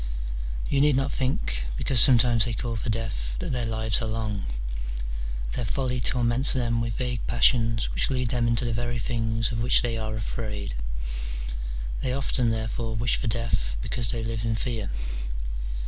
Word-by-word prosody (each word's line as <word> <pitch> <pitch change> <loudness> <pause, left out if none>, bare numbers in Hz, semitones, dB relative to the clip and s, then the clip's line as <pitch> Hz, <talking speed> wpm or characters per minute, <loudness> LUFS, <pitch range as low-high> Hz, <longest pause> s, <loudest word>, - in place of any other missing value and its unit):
You 140 - +2
need 145 -1 +5
not 135 +1 0
think, - - 0
because 130 - +4
some 125 +2 +9
times 115 -1 +4
they 120 - -2
call 115 +1 -2
for 110 - -3
death, 85 - -2
that - - -3
their 120 -2 0
lives 110 0 +1
are 110 - -1
long: 110 -2 -2 1.1
their 125 - 0
folly 125 +1 -1
torments 120 +3 +4
them 120 -3 +1
with 115 -2 -3
vague 125 -2 -2
passions 115 -1 +3
which - - +1
lead 125 -3 0
them 120 0 +1
into 115 +1 +2
the 120 - 0
very 120 +1 -1
things 115 -1 -1
of 115 -1 -2
which 120 - +4
they 115 -2 -1
are 110 0 -3
afraid: 105 - -4 1.3
they 125 - 0
often, 130 -2 +1
therefore, 110 0 -2
wish 115 +3 +2
for 130 - -3
death 105 - -1
because 120 -4 0
they 115 -1 -1
live 115 -1 -2
in 115 -1 0
fear. 110 -2 -2
115 Hz, 175 wpm, -26 LUFS, 110-125 Hz, 1.3 s, some